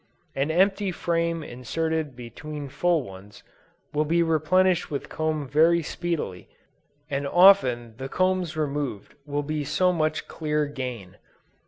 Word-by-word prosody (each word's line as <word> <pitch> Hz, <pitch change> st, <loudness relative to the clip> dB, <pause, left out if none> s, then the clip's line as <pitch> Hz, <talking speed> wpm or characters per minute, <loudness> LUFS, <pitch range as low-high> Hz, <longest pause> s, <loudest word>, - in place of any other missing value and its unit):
An 135 Hz, +3 st, -1 dB
empty 195 Hz, +3 st, +2 dB
frame 170 Hz, -1 st, -1 dB
inserted 155 Hz, +3 st, -3 dB
between 145 Hz, +5 st, -7 dB
full 160 Hz, +3 st, +1 dB
ones, 100 Hz, -1 st, -12 dB, 0.5 s
will 150 Hz, +1 st, +2 dB
be 170 Hz, +3 st, +2 dB
replenished 170 Hz, +3 st, +2 dB
with 140 Hz, -, -4 dB
comb 155 Hz, -2 st, -2 dB
very 165 Hz, +5 st, +4 dB
speedily, 155 Hz, -, -4 dB, 0.6 s
and 140 Hz, -1 st, -2 dB
often 135 Hz, -, +5 dB
the 135 Hz, +2 st, -6 dB
combs 185 Hz, -2 st, 0 dB
removed 145 Hz, -8 st, -3 dB
will 145 Hz, 0 st, -1 dB
be 155 Hz, 0 st, -2 dB
so 180 Hz, +5 st, +2 dB
much 155 Hz, -2 st, -1 dB
clear 150 Hz, -1 st, -1 dB
gain. 125 Hz, -9 st, -6 dB
155 Hz, 130 wpm, -25 LUFS, 140-170 Hz, 0.6 s, often